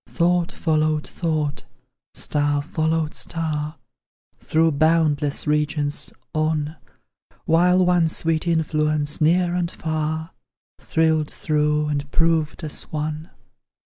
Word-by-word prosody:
Thought 175 0 +1
followed 155 -1 0
thought, 155 -4 -2 0.5
star 145 -1 0
followed 160 0 -1
star, 155 -2 -3 0.6
Through 160 +1 +2
boundless 150 -1 +2
regions, 150 -1 0 0.2
on; 155 0 -1 0.7
While 180 +3 +4
one 175 -2 +3
sweet 160 +1 0
influence, 155 -2 0
near 175 +3 +3
and 175 -1 0
far, 160 +1 -3 0.5
Thrilled 160 -2 +1
through, 150 -1 0
and 145 -1 -2
proved 165 -1 +1
us 155 - -6
one! 155 +2 -3
155 Hz, 100 wpm, -22 LUFS, 150-165 Hz, 0.7 s, While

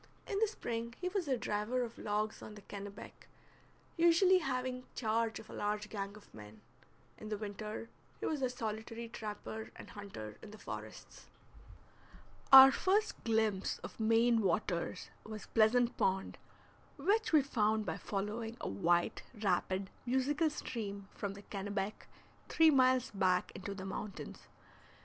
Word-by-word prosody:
In 400 - -2
the 445 - +4
spring 235 - -4
he 360 - -1
was 370 -4 -2
a 260 -2 +1
driver 225 +4 -1
of 230 -1 -7
logs 215 +1 -1
on 210 - -9
the 205 - -12
Kennebec, 200 0 -9 0.7
usually 345 +3 +6
having 255 -3 -2
charge 225 -1 0
of - - -10
a - - -11
large 210 0 -2
gang 200 -1 -4
of 210 - -18
men; 105 0 -11 0.6
in 215 - -7
the 210 - -2
winter 210 +2 -5 0.3
he - - -3
was 300 -3 -1
a 255 - +2
solitary 225 -1 -5
trapper 220 0 -6
and - - -11
hunter 150 - -8
in 220 - -10
the 215 - -11
forests. - - -9 1.2
Our 270 0 +12
first 410 +8 +1
glimpse 220 -4 +1
of - - -8
Maine 225 +1 +4
waters 190 -4 -1
was 215 -2 -7
Pleasant 235 +2 +3
Pond, 190 0 0 0.6
which 435 +2 +2
we 305 -4 +6
found 220 -5 +1
by - - -2
following 215 +3 -3
a - - -4
white, 170 - +1
rapid, 190 -2 0 0.2
musical 285 +6 +2
stream 200 -8 -5
from 200 -1 -4
the 200 - -11
Kennebec 200 0 -4 0.4
three 320 -1 +6
miles 255 -2 +4
back 185 -2 +1
into 200 +1 -6
the 190 -1 -6
mountains. 195 +1 -6
220 Hz, 150 wpm, -34 LUFS, 200-255 Hz, 1.2 s, Our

